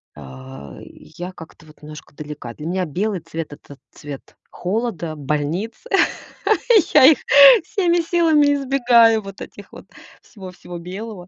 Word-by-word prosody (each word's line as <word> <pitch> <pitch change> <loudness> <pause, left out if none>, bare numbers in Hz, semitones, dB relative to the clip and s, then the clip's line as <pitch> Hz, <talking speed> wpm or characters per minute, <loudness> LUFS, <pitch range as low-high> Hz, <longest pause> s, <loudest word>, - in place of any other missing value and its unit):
А, 65 0 -12
я 180 +2 -11
как-то 160 -2 -15
вот 155 - -20
немножко 150 -1 -13
далека. 145 -6 -9
Для 150 - -10
меня 185 +1 -2
белый 190 +5 -3
цвет- 165 -2 -7
это 145 -1 -15
цвет 145 -2 -11 0.2
холода, 180 -5 -4
больниц. 150 +9 -3 1.2
Я 290 -3 +7
их 295 +2 +6 0.4
всеми 350 -2 0
силами 320 -4 +2
избегаю, 240 -5 +3
вот 195 -1 -11
этих - - -12
вот, - - -13 0.4
всего-всего 180 -4 -11
белого. 185 +2 -9
180 Hz, 130 wpm, -19 LUFS, 150-235 Hz, 1.2 s, Я